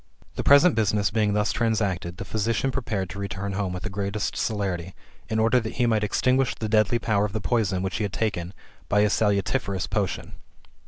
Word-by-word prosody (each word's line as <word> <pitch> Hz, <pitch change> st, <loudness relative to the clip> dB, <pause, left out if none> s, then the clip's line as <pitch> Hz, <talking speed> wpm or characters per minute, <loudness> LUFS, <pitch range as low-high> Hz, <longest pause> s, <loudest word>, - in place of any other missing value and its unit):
The -, -, -3 dB
present 145 Hz, +4 st, +6 dB
business 105 Hz, -2 st, +1 dB
being 105 Hz, -1 st, +1 dB
thus 105 Hz, 0 st, +1 dB
transacted, 100 Hz, -7 st, -1 dB
the 100 Hz, -, -6 dB
physician 115 Hz, +6 st, 0 dB
prepared 115 Hz, -8 st, -2 dB
to 100 Hz, -, -7 dB
return 100 Hz, 0 st, -4 dB
home 95 Hz, -1 st, -2 dB
with 90 Hz, +1 st, -5 dB
the 105 Hz, -, -3 dB
greatest 100 Hz, +1 st, -2 dB
celerity, 95 Hz, -5 st, -2 dB, 0.3 s
in 110 Hz, -, -1 dB
order 115 Hz, +3 st, +4 dB
that 110 Hz, -2 st, -5 dB
he 125 Hz, -, +2 dB
might 110 Hz, -2 st, +2 dB
extinguish 130 Hz, +5 st, +1 dB
the 110 Hz, -, -4 dB
deadly 110 Hz, +2 st, +3 dB
power 105 Hz, -3 st, +1 dB
of 105 Hz, -2 st, -2 dB
the 110 Hz, -, -1 dB
poison 100 Hz, -5 st, 0 dB
which 95 Hz, 0 st, -2 dB
he 105 Hz, -, -1 dB
had 100 Hz, -, -2 dB
taken, 90 Hz, -6 st, -2 dB, 0.4 s
by 105 Hz, -, +4 dB
a 105 Hz, -, +3 dB
salutiferous 100 Hz, -1 st, 0 dB
potion. -, -, -2 dB
105 Hz, 200 wpm, -25 LUFS, 100-115 Hz, 0.4 s, present